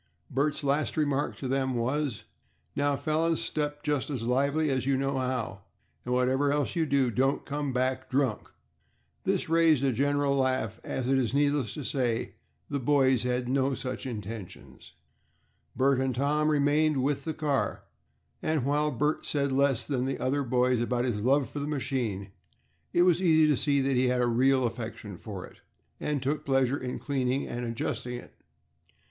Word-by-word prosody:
Bert's 145 +3 0
last 140 +3 0
remark 145 -2 0
to 135 - -5
them 130 0 0
was, 130 +1 -1 0.5
"Now, 145 0 +1
fellows, 160 +3 0
step 145 -1 -2
just 150 -3 -1
as 130 -6 -3
lively 140 +5 +1
as 130 -1 -1
you 135 -1 +3
know 135 0 -1
how, 125 -6 -2 0.4
and 125 - -5
whatever 130 +3 +2
else 145 -2 0
you 165 -2 +1
do, 135 -3 +2
don't 135 +4 +1
come 145 -1 -2
back 130 +1 -1
drunk." 130 -5 0 0.8
This - - 0
raised 165 -4 +4
a 135 - +3
general 140 +3 +1
laugh, 130 -5 0
as, 125 - -3
it 135 0 +3
is 125 0 -1
needless 145 -6 +1
to 150 - -5
say, 125 -3 -1 0.3
the 140 - -2
boys 130 -2 +3
had 125 - 0
had - - -8
no 135 0 +1
such 130 +1 -5
intentions. 110 -4 -8 0.8
Bert 135 +1 +3
and 130 -2 0
Tom 150 +3 +1
remained 150 -1 +2
with 140 0 0
the 160 0 -3
car, 145 -3 -1 0.6
and 155 -4 0
while 145 +3 +1
Bert 150 +3 0
said 140 -2 +1
less 135 -2 +2
than 130 -3 -1
the 135 - -2
other 140 +2 0
boys 125 -1 +2
about 120 +1 0
his 110 -5 -1
love 135 +3 +3
for 145 - -6
the 145 - -3
machine, 125 -9 -2 0.6
it 175 - +4
was 180 -1 +3
easy 160 -3 +5
to 150 - +4
see 140 +1 +1
that 135 0 +1
he 125 +1 +3
had 125 0 +2
a - - +3
real 130 +2 +3
affection 115 -3 -5
for 95 0 -7
it, - - -16 0.4
and 145 -3 -2
took 145 +2 -1
pleasure 135 -1 +1
in 125 -1 -4
cleaning 135 -2 -1
and 120 +1 -4
adjusting 120 +1 -3
it. 120 - -10
135 Hz, 175 wpm, -28 LUFS, 125-145 Hz, 0.8 s, easy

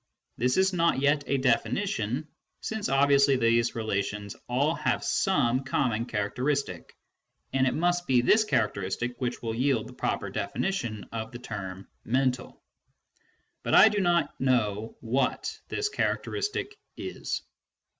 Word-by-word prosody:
This 125 +5 +1
is 190 0 +3
not 170 -5 +2
yet 145 +1 +2
a 140 - +1
definition, 130 - 0 0.3
since 220 -2 -3
obviously 140 0 +4
these 115 -1 +2
relations 105 -2 -2
all 140 +6 +2
have - - -1
some 130 -9 +1
common 120 -3 0
characteristic, 125 +7 -2 0.6
and 130 0 +3
it - - 0
must 175 +2 +1
be 125 -2 +4
this 215 - +5
characteristic 115 - -1
which 125 -1 -3
will 115 -1 -2
yield 125 -1 +1
the - - -11
proper - - -2
definition 120 - -2
of 110 +1 -5
the 120 - -7
term 100 -6 -7
" - - -47
mental." 130 +1 -1 1.0
But - - +1
I 220 - +9
do 210 -1 -1
not 175 -5 +2
know 110 -5 0
what 125 +3 -1
this 420 - -1
characteristic 420 0 -2 0.2
is. - - -4
130 Hz, 135 wpm, -28 LUFS, 115-150 Hz, 1.0 s, I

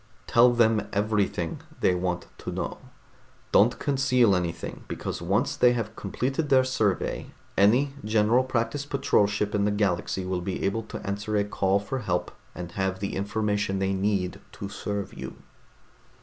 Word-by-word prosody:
Tell 120 +1 +6
them 110 -3 +3
everything 100 -5 0 0.2
they 90 - +3
want 90 0 -2
to - - -5
know. - - -4 0.7
Don't - - +5
conceal 130 -6 +3
anything, 85 -2 -3
because - - -4
once 95 +6 +1
they 125 -1 +5
have 115 -3 -3
completed 135 +9 -2
their 130 -1 +6
survey, 110 -7 0 0.3
any 125 +8 +4
General 110 +3 +3
Practice 130 +2 -1
Patrol 140 -7 +2
ship 105 0 -1
in 105 - +2
the 105 - +3
galaxy 95 -2 0
will 90 -1 -2
be 95 +1 -3
able 100 +3 0
to 110 - -8
answer 105 +2 -2
a 100 - +3
call 100 -1 +1
for 105 +6 -4
help 90 -6 -1 0.2
and 90 -1 -6
have 95 0 -1
the 100 - -3
information 105 0 -1
they 95 0 0
need 95 -2 0
to 100 - -6
serve 100 -1 -4
you." - - -7
105 Hz, 160 wpm, -26 LUFS, 95-115 Hz, 0.7 s, Tell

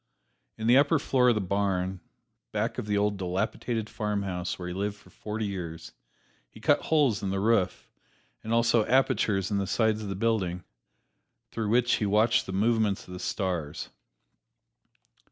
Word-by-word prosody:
In 110 - -4
the 120 +3 +6
upper 145 +3 +3
floor 130 -3 +3
of 120 - +3
the 105 - 0
barn, 95 -1 -1 0.5
back - - -2
of - - -5
the 105 -1 +1
old 100 0 +1
dilapidated 105 +4 -2
farmhouse 100 -5 -3
where 90 - -6
he 90 - -4
lived 100 +2 -2
for 105 - -20
forty 110 +1 -4
years, 90 -5 -6 0.6
he - - -15
cut - - +3
holes 145 -9 +2
in 100 - -2
the 95 0 -1
roof, 105 -2 +1 0.6
and 110 - -5
also 115 -1 +3
apertures 105 -6 +2
in 100 - +1
the 100 - -2
sides 110 0 +1
of 105 - -5
the 95 - -3
building, 95 -5 0 0.9
through 110 -2 -2
which 120 +2 +3
he 105 - -1
watched 110 +3 +3
the - - -4
movements 105 0 +1
of 90 - -9
the 90 - -7
stars. 90 -6 -3
105 Hz, 170 wpm, -28 LUFS, 95-115 Hz, 0.9 s, the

